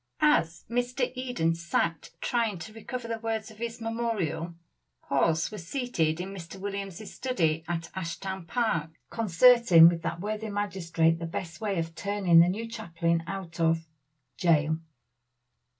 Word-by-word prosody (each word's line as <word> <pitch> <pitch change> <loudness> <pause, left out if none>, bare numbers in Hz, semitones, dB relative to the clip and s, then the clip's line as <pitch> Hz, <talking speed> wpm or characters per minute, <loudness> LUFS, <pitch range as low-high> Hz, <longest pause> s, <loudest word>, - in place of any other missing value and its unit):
As 170 - +3
Mr. 245 +2 -1
Eden 245 -11 0
sat 170 -1 -1
trying 230 -5 0
to 215 +6 -9
recover 235 +2 -6
the 230 -1 -3
words 225 -1 -3
of 215 - -16
his 235 0 -4
memorial, 225 -8 -2 0.5
Hawes 165 +3 +2
was 175 -6 -8
seated 175 - 0
in 190 +2 -5
Mr. 185 0 -9
Williams' 200 0 -5
study 165 -11 0
at 165 -1 -3
Ashtown 190 0 -5
Park, 220 -10 0 0.2
concerting 225 -4 +7
with 170 -1 -2
that 170 +1 -3
worthy 215 +3 -3
magistrate 175 -5 +1
the 165 - -4
best 165 +2 -6
way 205 -3 -1
of 165 0 -2
turning 195 -2 +3
the 170 +1 +6
new 220 +5 -3
chaplain 170 -6 -1
out 180 -3 -6
of 165 0 +2 0.5
Jail. 160 -2 +3
190 Hz, 145 wpm, -28 LUFS, 165-225 Hz, 0.5 s, concerting